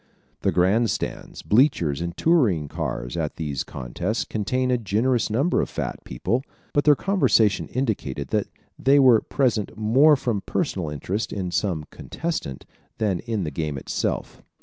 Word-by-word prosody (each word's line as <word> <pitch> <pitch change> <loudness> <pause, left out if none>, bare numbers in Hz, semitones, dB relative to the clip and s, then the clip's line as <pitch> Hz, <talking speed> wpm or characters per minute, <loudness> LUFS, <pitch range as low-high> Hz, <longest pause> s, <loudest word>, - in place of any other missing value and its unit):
The - - +2
grand 105 +6 +3
stands, - - -4
bleachers 90 - +2
and 85 0 -4
touring 115 - +3
cars 70 -6 -4
at - - -2
these 75 -5 -3
contests 85 - -3
contained 125 +4 -1
a 125 - +2
generous 115 +4 +1
number 135 +11 +2
of - - -3
fat - - -4
people, 115 - -1 0.3
but 145 - +2
their 150 -1 +7
conversation 130 - +2
indicated 85 - -2
that - - 0 0.3
they 135 +2 +4
were 125 -5 +6
present 120 -8 -1
more 130 +8 +5
from 120 -7 -1
personal 95 - -2
interest 90 +9 -3
in 95 -3 -3
some 85 -6 -1
contestant 160 - -5 0.3
than 100 -5 0
in 110 -5 -3
the 75 - -3
game 75 0 -3
itself. - - -3
105 Hz, 150 wpm, -24 LUFS, 80-130 Hz, 0.3 s, their